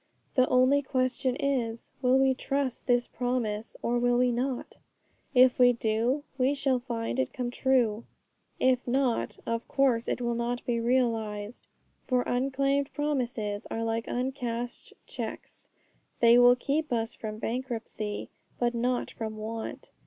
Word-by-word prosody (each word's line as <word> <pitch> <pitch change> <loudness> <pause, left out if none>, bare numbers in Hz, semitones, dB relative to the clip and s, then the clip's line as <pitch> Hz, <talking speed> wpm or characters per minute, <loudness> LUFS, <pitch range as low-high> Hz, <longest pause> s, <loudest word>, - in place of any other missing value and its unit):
The 255 -1 +4
only 255 +3 +4
question 255 -1 0
is, 245 -5 -2
will 255 0 +4
we 265 0 +4
trust 270 0 -2
this 245 -1 +3
promise, 235 -3 -2
or 240 +1 +1
will 245 0 +3
we 250 0 +3
not? 250 +1 -3 0.6
If 255 0 +6
we 245 0 +7
do, 230 +5 0 0.2
we 260 +3 +3
shall 270 -2 +1
find 240 0 -3
it 260 - 0
come 245 -2 -3
true. 245 -4 +1 0.5
If 255 -1 +2
not, 255 -1 0
of 230 0 -2
course 255 -4 +2
it - - -1
will 240 -1 -1
not 235 +1 -2
be 235 -1 0
realized. 230 -3 -1 0.4
For 250 -1 +2
unclaimed 275 +2 0
promises 245 -8 -2
are 225 - -2
like 225 0 -1
uncashed 245 -2 -3
cheques; - - -7 0.5
they 235 +1 +7
will 245 0 +7
keep 290 +4 -1
us 225 -1 -1
from 215 -1 -6
bankruptcy, 225 -3 -4 0.3
but 240 0 +1
not 245 +1 -1
from 220 -1 -5
want. 220 +1 -6
245 Hz, 145 wpm, -28 LUFS, 230-260 Hz, 0.6 s, we